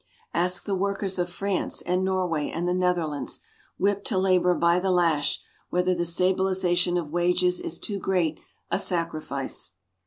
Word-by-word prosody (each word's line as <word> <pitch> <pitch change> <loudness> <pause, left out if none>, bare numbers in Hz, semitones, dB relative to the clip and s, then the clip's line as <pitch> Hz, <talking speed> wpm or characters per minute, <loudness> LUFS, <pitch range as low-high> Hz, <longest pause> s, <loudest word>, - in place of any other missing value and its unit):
Ask 180 +2 +1
the 200 - -1
workers 195 0 -1
of 175 0 0
France 195 +1 -2
and 180 +1 0
Norway 180 -5 0
and 170 +2 -2
the 180 - +2
Netherlands, 175 -5 -1 0.4
whipped 200 +1 +1
to 205 - 0
labor 180 -1 +3
by 170 +1 +3
the 190 +1 0
lash, 165 -5 +2 0.3
whether 180 +1 +2
the 175 -1 -1
stabilization 180 0 +2
of 160 -4 -3
wages 180 +1 +2
is 165 - -4
too 200 +2 -3
great 175 -5 0 0.3
a - - +2
"sacrifice." 155 - -2
180 Hz, 155 wpm, -26 LUFS, 170-185 Hz, 0.4 s, labor